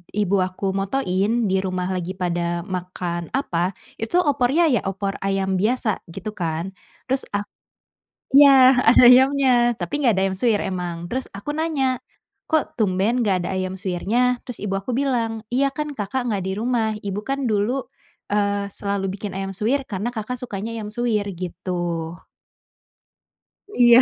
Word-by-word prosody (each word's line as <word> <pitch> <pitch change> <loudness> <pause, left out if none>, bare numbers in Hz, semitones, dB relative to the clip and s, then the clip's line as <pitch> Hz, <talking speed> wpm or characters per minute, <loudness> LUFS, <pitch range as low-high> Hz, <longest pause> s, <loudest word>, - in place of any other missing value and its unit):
ibu 200 -2 +2
aku 185 +1 -1
motoin 195 +2 0
di 190 - +3
rumah 185 -1 -2
lagi 185 0 -3
pada 175 -1 -1
makan 180 -2 -4
apa, 185 -8 -1 0.2
itu 225 +9 -3
opornya 290 -2 +3
ya 240 - +3
opor 195 +1 -3
ayam 195 -1 0
biasa 220 0 +1
gitu 210 +5 -6
kan. 170 -1 -3 0.3
Terus 265 +1 -2
ak 205 - 0 0.9
iya 270 -2 +8
ada 240 +2 +6
ayamnya 250 -2 +5
tapi 290 0 -3
nggak 240 -5 +4
ada - - +2
ayam 190 - 0
suwir 230 -4 +3
emang. 175 -2 -4
Terus 255 +8 -4
aku 295 +9 -4
nanya, 275 -5 0 0.5
"Kok 315 -2 +1
tumben 205 +5 +1
nggak 190 -5 +1
ada - - -2
ayam 185 0 -2
suwirnya?" 230 +8 0
Terus 245 - -8
ibu 195 -1 -3
aku 195 +5 -3
bilang, 230 -5 -1
"Iya 275 +2 +3
kan 300 +1 -4
Kakak 235 +3 -3
nggak 210 -5 -1
di 190 - -3
rumah, 225 -1 0
Ibu 200 +1 -2
kan 275 +2 -2
dulu, 225 +5 0 0.5
eee, 200 -1 +1
selalu 200 -1 -2
bikin 200 -1 -5
ayam 195 0 -4
suwir 240 +8 0
karena 210 +2 -3
Kakak 245 +1 -5
sukanya 225 -2 -5
ayam 215 -2 -5
suwir." 215 -3 -1
Gitu. 180 0 -6 2.0
Iya. 240 - +7
210 Hz, 155 wpm, -22 LUFS, 190-250 Hz, 2.0 s, iya